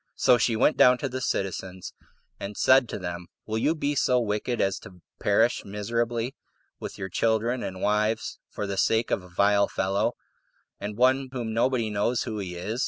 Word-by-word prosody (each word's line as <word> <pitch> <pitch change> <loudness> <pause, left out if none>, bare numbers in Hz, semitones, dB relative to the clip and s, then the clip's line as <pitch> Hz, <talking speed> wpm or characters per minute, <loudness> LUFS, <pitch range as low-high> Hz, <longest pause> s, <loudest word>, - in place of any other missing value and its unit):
So 125 - +4
she 115 +1 +2
went 130 +7 +3
down 125 0 +6
to 135 - -3
the 130 0 -5
citizens, 95 -4 -3 0.5
and 100 +1 -6
said 130 -2 +5
to - - -4
them, 90 -2 -6 0.2
"Will 110 0 -2
you 155 +8 +2
be 145 -2 -1
so 125 -2 +2
wicked 115 +2 -2
as 95 -1 +1
to 90 -2 -14 0.2
perish 110 +4 +2
miserably, 115 +4 -2 0.5
with - - -7
your 95 - -4
children 115 +5 0
and 95 -1 -5
wives, 105 +2 0
for 105 - -4
the 100 -1 -4
sake 115 +3 +2
of - - +1
a 90 - -14
vile 100 +2 +3
fellow, 95 +1 0 0.7
and 105 0 -5
one 130 +2 +3
whom 120 -3 -3
nobody 115 -1 +1
knows 110 +4 0
who 110 -1 -4
he 90 -3 -5
is? 105 +7 -4
110 Hz, 185 wpm, -26 LUFS, 100-120 Hz, 0.7 s, down